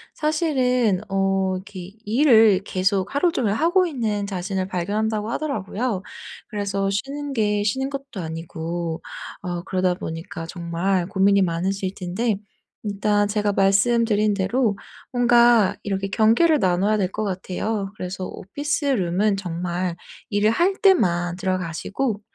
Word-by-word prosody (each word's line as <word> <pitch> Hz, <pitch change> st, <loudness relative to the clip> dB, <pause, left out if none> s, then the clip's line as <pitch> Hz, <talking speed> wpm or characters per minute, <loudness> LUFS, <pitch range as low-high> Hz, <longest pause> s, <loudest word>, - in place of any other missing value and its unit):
사실은 255 Hz, -, +1 dB
어 195 Hz, 0 st, +1 dB, 0.3 s
기 195 Hz, 0 st, -10 dB
일을 220 Hz, -5 st, +5 dB
계속 190 Hz, 0 st, 0 dB
하루 335 Hz, +4 st, +3 dB
종일 220 Hz, -9 st, 0 dB
하고 345 Hz, -, +3 dB
있는 220 Hz, -8 st, -2 dB
자신을 190 Hz, 0 st, -3 dB
발견한다고 210 Hz, +4 st, -1 dB
하더라고요. 230 Hz, -6 st, -2 dB, 0.5 s
그래서 200 Hz, -2 st, -2 dB
쉬는 280 Hz, +7 st, -3 dB
게 210 Hz, -3 st, +1 dB
쉬는 265 Hz, +6 st, 0 dB
것도 275 Hz, -6 st, -6 dB
아니고 165 Hz, 0 st, -4 dB, 0.4 s
어 175 Hz, -1 st, -4 dB
그러다 185 Hz, -1 st, 0 dB
보니까 165 Hz, 0 st, -6 dB
정말 175 Hz, +2 st, -1 dB
고민이 195 Hz, +1 st, +3 dB
많으실 185 Hz, +3 st, -1 dB
텐데. 195 Hz, +4 st, -1 dB, 0.5 s
일단 205 Hz, 0 st, +1 dB
제가 205 Hz, 0 st, 0 dB
말씀드린 210 Hz, +2 st, +3 dB
대로 205 Hz, +2 st, 0 dB, 0.4 s
뭔가 235 Hz, -4 st, +5 dB
이렇게 195 Hz, -1 st, -2 dB
경계를 230 Hz, +10 st, +4 dB
나눠야 190 Hz, +2 st, +2 dB
될 190 Hz, -2 st, 0 dB
것 215 Hz, +2 st, -3 dB
같아요. 195 Hz, +2 st, -3 dB
그래서 185 Hz, +1 st, -5 dB
오피스 290 Hz, -, -3 dB
룸은 200 Hz, -5 st, +1 dB
정말 175 Hz, -1 st, -3 dB, 0.3 s
일을 210 Hz, 0 st, +2 dB
할 350 Hz, +11 st, +2 dB
때만 175 Hz, -, +3 dB
들어가시고 190 Hz, +5 st, -2 dB
200 Hz, 285 characters per minute, -23 LUFS, 185-230 Hz, 0.5 s, 일을